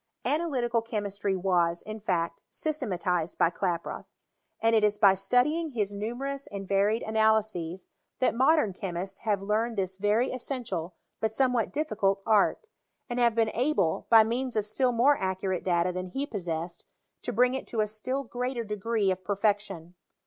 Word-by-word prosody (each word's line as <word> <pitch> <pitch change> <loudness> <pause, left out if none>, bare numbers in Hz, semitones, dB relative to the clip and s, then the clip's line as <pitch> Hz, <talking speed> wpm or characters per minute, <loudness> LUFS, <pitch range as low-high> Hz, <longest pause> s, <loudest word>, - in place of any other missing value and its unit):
Analytical 260 -7 0
chemistry 205 -3 -2
was, 175 -2 +1
in 215 +1 -7
fact, 170 -5 -1
systematized 185 - -2
by 165 - +3
Klaproth; 175 -2 -3 0.5
and 225 0 +3
it 220 - +3
is 210 0 +3
by 200 -2 +6
studying 250 - +1
his 205 -3 -1
numerous 255 +7 -4
and 195 -1 -7
varied 200 +4 +2
analyses, 220 -5 +1 0.3
that 255 - +2
modem 260 - +3
chemists 185 -1 -4
have 205 -3 -1
learned 220 +3 0
this 190 -1 -2
very 210 +5 +2
essential, 230 - -4 0.2
but 220 0 -1
somewhat 250 -3 +2
difficult 200 -10 0
art; 220 - +2 0.4
and 240 - -1
have 235 -2 +3
been 225 -1 +2
able, 235 - 0
by 225 -1 +8
means 245 +3 -2
of 215 -2 +1
still 250 +4 +1
more 260 +5 +4
ac 190 -1 -1
curate 190 -2 -1
data 175 0 +1
than 185 +1 -4
he 270 +10 -3
possessed, 170 - -4 0.4
to - - -3
bring 250 +1 +3
it 265 - -4
to 230 - -4
a - - +2
still 245 +6 -3
greater 250 0 -3
degree 210 -1 0
of 185 0 -4
perfection. 200 -3 -1
215 Hz, 165 wpm, -28 LUFS, 190-245 Hz, 0.5 s, by